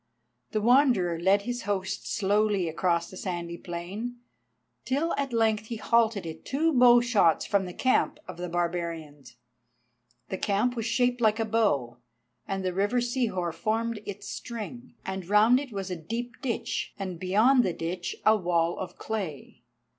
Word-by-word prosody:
The 215 - -1
Wanderer 235 - +4
led 195 +3 +3
his 245 +1 -3
host 195 0 -2
slowly 205 -2 +1
across 170 +1 0
the - - -10
sandy 170 -3 -4
plain, 195 +8 -5 0.7
till 290 +6 0
at 275 -2 -2
length 220 -2 +1
he 235 - -4
halted 225 -3 +2
it 160 -1 -7
two 315 +4 +1
bow 245 -2 +7
shots 215 -9 +3
from 200 -1 +1
the 180 - -7
camp 255 - +1
of - - -8
the 180 0 -4
barbarians. 165 -6 -3 0.9
The 190 - -3
camp 215 +5 +1
was 230 -1 -2
shaped 245 +1 +1
like 220 0 +3
a 225 - +1
bow, 145 - 0 0.5
and 195 -1 -3
the 185 - 0
river 205 +6 +1
Sihor 235 -9 -1
formed 220 +5 -1
its 205 0 -6
string, 240 +2 -7
and 190 -2 -5
round 220 +5 +6
it 275 -3 -7
was 195 -2 -4
a - - -1
deep 235 +7 -4
ditch 255 -5 -3
and 185 -3 -5
beyond 220 +8 +4
the 185 - 0
ditch 175 +2 -4
a 215 - +7
wall 170 -3 0
of 190 - -6
clay. 195 -10 -5
205 Hz, 160 wpm, -27 LUFS, 175-235 Hz, 0.9 s, bow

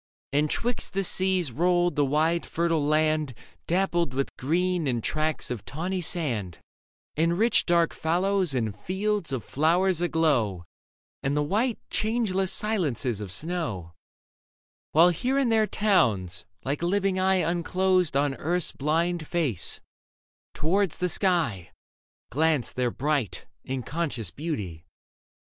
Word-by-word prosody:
And 150 +2 +2
'twixt 240 +7 -2
the 195 +1 0
seas 185 -5 +1
rolled 175 +5 +2
the 145 - +3
wide 155 +5 +1
fertile 165 -2 0
land, 155 -2 +1 0.3
Dappled 175 -5 +1
with 135 0 -2
green 175 +3 0
and 120 -4 -1
tracts 155 -3 -1
of 120 -5 -4
tawny 180 +5 -3
sand, 120 - -1 0.6
And 165 +2 +1
rich, 230 +4 +3
dark 170 -2 +3
fallows 180 0 +1
and 110 -5 -1
fields 190 - -2
of 130 -5 -2
flowers 170 - +2
aglow 140 - +1 0.6
And 140 +2 0
the 150 - +2
white, 220 - 0
changeless 215 -4 0
silences 145 - 0
of 100 -3 -6
snow; 130 - -3 1.0
While 165 +3 +6
here 250 - 0
and 265 -4 +2
there 220 -1 +3
towns, 105 - +1 0.2
like 140 +3 -2
a 170 - 0
living 195 0 +1
eye 190 0 +3
Unclosed 180 -1 +1
on 140 -1 +1
earth's 175 +2 -1
bhnd 160 +3 -1
face, 150 - -1 0.7
towards 185 +3 +1
the 180 - 0
sky 160 - 0 0.6
Glanced 155 -1 +1
their 125 -1 +1
bright 140 -3 -2 0.4
conscious 145 - -3
beauty. 100 - -5
165 Hz, 130 wpm, -26 LUFS, 135-185 Hz, 1.0 s, While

